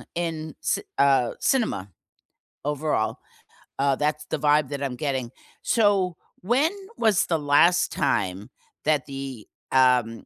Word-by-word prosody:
in 160 -3 -3
ci - - 0 0.2
uh, 135 -4 +4
cinema, 225 - 0 0.8
overall, 150 -6 -1 0.6
uh, 140 0 +2
that's 150 0 -1
the 155 - -3
vibe 150 -1 +3
that 140 -1 -5
I'm 130 -2 -2
getting. 130 -3 -3 0.3
So, 200 -6 +2 0.3
when 260 - +2 0.3
was 215 -5 +3
the 165 -2 0
last 150 +5 +4
time 95 +5 -1 0.4
that 150 -4 +2
the, 135 -5 -7 0.3
um, 125 -4 +3
145 Hz, 125 wpm, -25 LUFS, 130-165 Hz, 0.8 s, uh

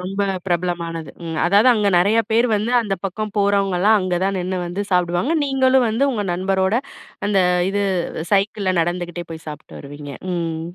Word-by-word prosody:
ரொம்ப 195 +2 -3 0.2
பிரபலமானது 170 -3 -2
ம். 165 -1 -4
அதாவது, 205 +7 +5
அங்க 210 -2 +1
நெறையா 205 +6 +3
பேர் 235 +2 +4
வந்து, 215 +3 -2
அந்த 200 -3 -2
பக்கம் 210 +2 -3
போறவங்கள்லாம் 200 0 +3
அங்க 185 -1 -1
தான் 195 0 0
நின்னு 185 +1 -2
வந்து 180 +4 -3
சாப்டுவாங்க. 180 - +1
நீங்களும் 265 -2 +3
வந்து 240 +6 +1
உங்க 210 -4 -2
நண்பரோட, 190 +2 0 0.5
அந்த 200 -2 +2 0.3
இது 205 +1 0 0.5
சைக்கிள்ல 200 -1 +1
நடந்துகிட்டே 175 0 -3
போய் 160 0 -9
சாப்ட்டு 150 0 -10
வருவீங்க. 145 0 -9 0.2
ம். 165 -2 -2
190 Hz, 155 wpm, -20 LUFS, 175-210 Hz, 0.5 s, அதாவது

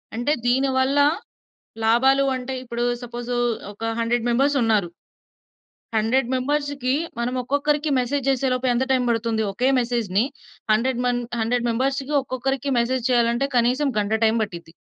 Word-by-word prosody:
అంటే 245 +6 +1
దీనివల్ల 265 +2 +2 0.9
లాభాలు 265 +5 +4
అంటే 255 +1 -5
ఇప్పుడు 240 -1 -3 0.2
సపోజు 240 0 -4 0.4
ఒక 210 +2 -8 0.2
100 230 +1 0
మెంబర్స్ 275 +4 +2
ఉన్నారు. 215 -5 +2 1.1
100 235 +3 +1
మెంబర్స్‌కీ 280 0 -1 0.3
మనం 240 +1 -1
ఒక్కొక్కరికి 290 +4 0
మెసేజ్ 265 +3 -1
చేసే 270 0 +1
లోపు 255 +1 -1
ఎంత 240 +2 +1
టైమ్ 255 -1 +2
పడుతుంది? 230 -1 0
ఒకే 250 +7 +1
మెసేజ్‌ని 230 -5 0 0.5
100 240 +3 +1
మంది, 245 0 0 0.2
100 240 +2 0
మెంబర్స్‌కి 270 +4 -1
ఒక్కొక్కరికి 270 +1 -2
మెసేజ్ 240 +1 -1
చేయాలంటే 240 +2 +2
కనీసం 250 +5 +2
గంట 205 +1 -1
టైమ్ 225 +1 +2
పట్టిద్ది. 170 -5 -8
245 Hz, 135 wpm, -23 LUFS, 235-270 Hz, 1.1 s, లాభాలు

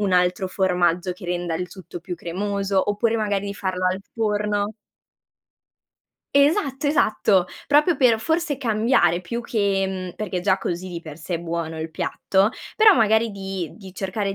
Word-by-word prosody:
un 200 -3 0
altro 180 +2 +2
formaggio 180 -1 +1
che 180 +1 -13
renda 175 -1 -2
il 180 +2 -3
tutto 180 -2 -10
più 180 +1 -5
cremoso, 195 +2 -1
oppure 225 +2 +1
magari 205 -2 -1
di 200 - -4
farlo 185 -2 -2
al 185 +1 0
forno 210 -1 0 1.6
Esatto, 280 -1 +3
esatto, 210 - +3 0.2
proprio 300 +3 +4
per 240 -5 +4
forse 320 0 0
cambiare 215 - +2
più 235 +7 -4
che 200 -5 0
mhmm, 185 -2 -5
perché 190 -4 -3
già 190 0 +2
così 185 0 -3
di 170 - -5
per 155 -3 -9
sé 165 +2 -5
è - - -7
buono 165 -1 -4
il 160 0 -4
piatto, 195 +5 +1 0.3
però 435 -2 +7
magari 220 0 +3
di 195 -4 -5
di 190 -4 -12
cercare 195 +1 -2
195 Hz, 165 wpm, -23 LUFS, 180-220 Hz, 1.6 s, però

